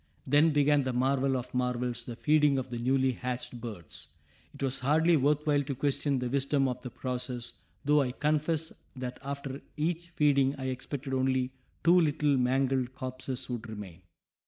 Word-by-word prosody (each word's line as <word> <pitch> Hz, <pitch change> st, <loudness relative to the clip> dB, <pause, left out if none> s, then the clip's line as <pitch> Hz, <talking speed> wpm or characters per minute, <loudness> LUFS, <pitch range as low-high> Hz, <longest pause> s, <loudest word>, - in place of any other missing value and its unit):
Then 145 Hz, +4 st, +5 dB
began 145 Hz, -1 st, +4 dB
that 130 Hz, -2 st, -1 dB
marvel 135 Hz, +1 st, +2 dB
of 125 Hz, 0 st, -6 dB
marvels, 125 Hz, -1 st, -1 dB
the 120 Hz, -, -6 dB
feeding 150 Hz, +1 st, +3 dB
of 130 Hz, -1 st, -3 dB
the 120 Hz, -, -3 dB
newly 130 Hz, +2 st, +2 dB
hatched 125 Hz, -1 st, -5 dB
birds. 105 Hz, -9 st, -8 dB, 0.4 s
It 140 Hz, -, -8 dB
was 135 Hz, 0 st, -1 dB
hardly 160 Hz, +6 st, +4 dB
worth 150 Hz, +1 st, +2 dB
while 145 Hz, -2 st, +3 dB
to 140 Hz, -1 st, -4 dB
question 140 Hz, +1 st, 0 dB
the 125 Hz, -1 st, -1 dB
wisdom 140 Hz, +1 st, +1 dB
of 125 Hz, -1 st, -3 dB
the 125 Hz, -, -6 dB
process, 125 Hz, -1 st, -4 dB, 0.3 s
though 150 Hz, +1 st, +5 dB
I 130 Hz, -2 st, 0 dB
confess 155 Hz, +3 st, 0 dB, 0.2 s
that 125 Hz, -1 st, -5 dB
after 140 Hz, 0 st, -5 dB, 0.2 s
each 170 Hz, +3 st, -1 dB
feeding 140 Hz, -4 st, +3 dB
I 130 Hz, -1 st, -3 dB
expected 135 Hz, +1 st, -4 dB
only 130 Hz, -1 st, +1 dB, 0.3 s
two 175 Hz, +1 st, +6 dB
little 150 Hz, -2 st, +2 dB
mangled 130 Hz, 0 st, +1 dB
corpses 130 Hz, 0 st, -5 dB
would 120 Hz, -2 st, -5 dB
remain! 100 Hz, -5 st, -8 dB
135 Hz, 170 wpm, -30 LUFS, 125-145 Hz, 0.4 s, two